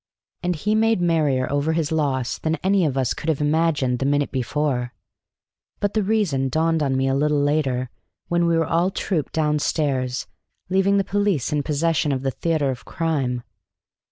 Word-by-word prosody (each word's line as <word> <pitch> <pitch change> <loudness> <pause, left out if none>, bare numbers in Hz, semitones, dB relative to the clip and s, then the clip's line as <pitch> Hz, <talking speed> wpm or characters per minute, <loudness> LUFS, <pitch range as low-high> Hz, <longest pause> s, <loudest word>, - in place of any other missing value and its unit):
And 180 0 0
he 210 +8 -1
made 225 -1 +3
merrier 155 -7 +1
over 145 +3 +1
his 160 -2 -1
loss 135 -6 -1
than 160 0 0
any 190 -1 +3
of 135 -2 -2
us 130 -3 +1
could 160 - -5
have 155 - +1
imagined 150 -4 +1
the 135 - -1
minute 145 0 +1
before; 130 -1 -1 0.9
but 205 0 0
the 215 - +2
reason 190 -11 +1
dawned 160 +3 +1
on 135 -2 +1
me 135 0 +1
a 135 - +1
little 150 +1 +2
later, 140 -4 0 0.4
when 170 0 +1
we 165 -1 +2
all 165 +3 +2
trooped 180 -5 -2
down 150 -1 +1
stairs, 130 -5 -1 0.4
leaving 195 +1 +3
the 195 - +2
police 200 - 0
in 150 - +1
possession 150 +1 0
of 135 -1 -2
the 135 - 0
theatre 155 -2 0
of 125 - -7
crime. 135 -7 -2
150 Hz, 180 wpm, -22 LUFS, 135-170 Hz, 0.9 s, made